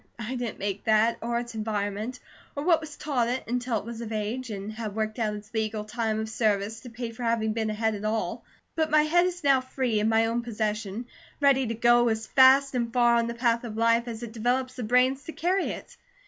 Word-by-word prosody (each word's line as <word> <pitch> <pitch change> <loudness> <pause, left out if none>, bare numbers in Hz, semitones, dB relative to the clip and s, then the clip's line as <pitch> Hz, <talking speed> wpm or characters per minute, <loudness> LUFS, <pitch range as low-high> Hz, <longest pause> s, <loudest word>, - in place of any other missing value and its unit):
I 235 +2 -4
didn't 240 -3 -4
make 200 0 -4
that, 220 +1 +3
or 235 +1 -1
its 240 0 -4
environment, 215 +2 -3 0.4
or 285 - -3
what 330 -1 +4
was 305 -2 -9
taught 260 -6 0
it, 255 +2 -2
until 245 0 -1
it 205 - -6
was 235 0 -6
of 225 -1 -6
age, 220 +4 -3
and 205 0 -5
had 215 -2 -5
worked 215 +1 -2
out 215 -2 0
its 210 +2 -11
legal 215 -1 -2
time 220 0 -1
of 220 - -3
service 220 -1 0
to 245 +2 -10
pay 235 0 -5
for 230 - -11
having 230 -2 +1
been 220 -1 -1
a 215 - -2
head 220 0 0
at 205 0 -6
all. 215 +1 -2 0.3
But 315 -1 +1
my 305 0 +5
head 350 +4 +3
is 355 -1 -5
now 275 -2 +4
free, 255 -4 -1
in 215 +1 +2
my 225 0 +3
own 230 +1 0
possession, 215 -1 -3 0.3
ready 275 -3 +4
to 230 - -2
go 240 +1 +4
as 220 0 -1
fast 270 +2 +6
and 235 -2 -1
far 240 -1 +4
on 230 0 +1
the 235 - -4
path 235 -1 +1
of 220 -2 -6
life 230 +1 +3
as 230 0 -6
it 235 - -6
develops 250 +3 0
the 255 - -7
brains 250 +4 +2
to 325 - -7
carry 365 +3 0
it. - - -8
230 Hz, 240 wpm, -27 LUFS, 220-250 Hz, 0.4 s, fast